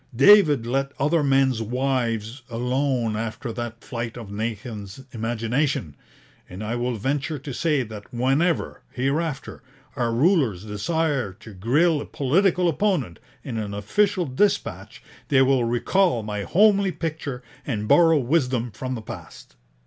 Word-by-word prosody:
David 150 Hz, -, +6 dB
let 135 Hz, +3 st, -1 dB
other 150 Hz, +4 st, +2 dB
men's 135 Hz, -4 st, +2 dB
wives 120 Hz, -1 st, -1 dB
alone 125 Hz, -1 st, 0 dB
after 115 Hz, +1 st, -4 dB
that 120 Hz, 0 st, -6 dB
flight 115 Hz, -1 st, -5 dB
of 110 Hz, -4 st, -8 dB
Nathan's 105 Hz, 0 st, -5 dB
imagination; 115 Hz, -, -1 dB, 0.5 s
and 95 Hz, +4 st, -7 dB
I 110 Hz, +3 st, -2 dB
will 120 Hz, 0 st, -1 dB
venture 140 Hz, +7 st, -2 dB
to 135 Hz, 0 st, -7 dB
say 150 Hz, -2 st, +1 dB
that 105 Hz, -3 st, -10 dB
whenever, 135 Hz, +8 st, 0 dB
hereafter, 140 Hz, +2 st, -2 dB, 0.3 s
our 120 Hz, -4 st, 0 dB
rulers 125 Hz, -, +2 dB
desire 135 Hz, -, -1 dB
to 110 Hz, +2 st, -13 dB
grille 145 Hz, -, +2 dB
a -, -, -7 dB
political 180 Hz, +6 st, +2 dB
opponent 165 Hz, -, 0 dB, 0.2 s
in 115 Hz, -5 st, -4 dB
an 100 Hz, -2 st, -4 dB
official 185 Hz, -, +1 dB
dispatch, 200 Hz, +10 st, -1 dB, 0.2 s
they 135 Hz, -3 st, +4 dB
will 130 Hz, -2 st, +3 dB
recall 120 Hz, -, +1 dB
my 105 Hz, -1 st, -4 dB
homely 200 Hz, 0 st, +4 dB
picture 155 Hz, -7 st, -5 dB, 0.2 s
and 105 Hz, -1 st, -2 dB
borrow 165 Hz, +2 st, +6 dB
wisdom 125 Hz, -4 st, 0 dB
from 130 Hz, +4 st, -4 dB
the 110 Hz, -, -7 dB
past.' -, -, -10 dB
130 Hz, 135 wpm, -24 LUFS, 115-150 Hz, 0.5 s, David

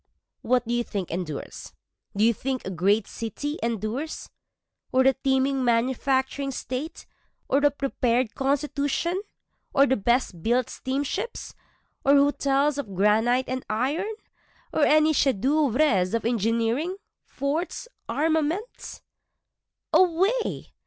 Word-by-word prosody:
What 245 Hz, -1 st, +1 dB
do 235 Hz, -, -1 dB
you 240 Hz, 0 st, +1 dB
think 200 Hz, -6 st, -4 dB
endures? 165 Hz, -4 st, -6 dB, 0.4 s
Do 210 Hz, -, +3 dB
you 230 Hz, +1 st, +5 dB
think 260 Hz, +3 st, -3 dB
a 190 Hz, -, -3 dB
great 195 Hz, +4 st, +2 dB
city 290 Hz, +7 st, -5 dB
endures? 230 Hz, +6 st, -3 dB, 0.6 s
Or 260 Hz, -, +4 dB
a 265 Hz, +1 st, +5 dB
teeming 265 Hz, 0 st, +1 dB
manufacturing 265 Hz, +3 st, +1 dB
state? 270 Hz, +4 st, -5 dB, 0.4 s
or 275 Hz, -, +3 dB
a 290 Hz, 0 st, +4 dB
prepared 255 Hz, -4 st, 0 dB
constitution? 285 Hz, +5 st, -1 dB, 0.5 s
or 275 Hz, -, +6 dB
the 265 Hz, -, +2 dB
best 225 Hz, -5 st, 0 dB
built 240 Hz, +5 st, +1 dB
steamships? 285 Hz, -, -3 dB, 0.5 s
Or 280 Hz, +1 st, +5 dB
hotels 280 Hz, 0 st, +2 dB
of 205 Hz, -9 st, -6 dB
granite 225 Hz, +6 st, +3 dB
and 255 Hz, 0 st, -3 dB
iron? 275 Hz, -, -1 dB, 0.6 s
or 300 Hz, -, +3 dB
any 310 Hz, +1 st, +4 dB
chef 275 Hz, -3 st, +3 dB
d'oeuvres 255 Hz, -5 st, +2 dB
of 230 Hz, -, -2 dB
engineering, 230 Hz, -, 0 dB, 0.3 s
forts, 315 Hz, +11 st, -3 dB, 0.2 s
armaments? 320 Hz, -, -1 dB
265 Hz, 115 wpm, -25 LUFS, 230-285 Hz, 0.6 s, or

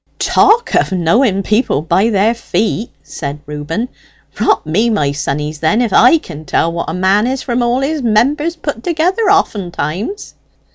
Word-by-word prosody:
"Talk 465 Hz, +2 st, +2 dB
of -, -, +2 dB
knowing 195 Hz, +4 st, +1 dB
people 210 Hz, -, 0 dB
by 195 Hz, +7 st, +2 dB
their 215 Hz, +1 st, +2 dB
feet!" 225 Hz, -1 st, -2 dB
said 140 Hz, +1 st, -6 dB
Reuben. 150 Hz, -, -4 dB, 0.5 s
"Rot -, -, +1 dB
me, 205 Hz, +10 st, +1 dB
my 150 Hz, -11 st, +1 dB
sonnies, 150 Hz, +1 st, -3 dB
then, 165 Hz, +9 st, +1 dB
if 235 Hz, -5 st, 0 dB
I 250 Hz, +7 st, +6 dB
can 155 Hz, -, -10 dB
tell 165 Hz, +3 st, 0 dB
what 170 Hz, -1 st, -3 dB
a -, -, -3 dB
man 195 Hz, +4 st, +2 dB
is 265 Hz, +1 st, -2 dB
from 245 Hz, -1 st, -1 dB
all 240 Hz, +2 st, +1 dB
his 295 Hz, +2 st, -1 dB
members 275 Hz, +9 st, +1 dB
put 290 Hz, -7 st, -5 dB
together, 350 Hz, +5 st, 0 dB
oftentimes." 205 Hz, -, -1 dB
215 Hz, 160 wpm, -15 LUFS, 165-260 Hz, 0.5 s, I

